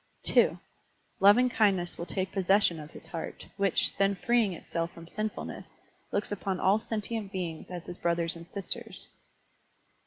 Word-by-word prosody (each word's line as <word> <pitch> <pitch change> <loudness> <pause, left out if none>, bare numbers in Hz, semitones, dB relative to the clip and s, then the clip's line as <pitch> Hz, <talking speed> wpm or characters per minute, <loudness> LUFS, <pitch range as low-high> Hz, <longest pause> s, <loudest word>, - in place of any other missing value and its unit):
(2) - - +4 0.6
Lovingkindness 205 -4 +5
will 170 - -6
take 185 -1 -2
possession 190 -3 +3
of 150 0 -8
his - - -11
heart, 165 -2 -6
which, 200 -3 +2
then 195 0 +4
freeing 230 +2 +2
itself 170 -1 -3
from 165 -1 -12
sinfulness, 215 +4 -5 0.3
looks 205 +1 -1
upon 195 -2 -2
all 200 +3 +4
sentient 220 -2 -3
beings 175 -5 -4
as 180 -1 -6
his 175 - -6
brothers 170 0 +1
and 170 0 -10
sisters. 195 0 -5
190 Hz, 145 wpm, -30 LUFS, 170-205 Hz, 0.6 s, Lovingkindness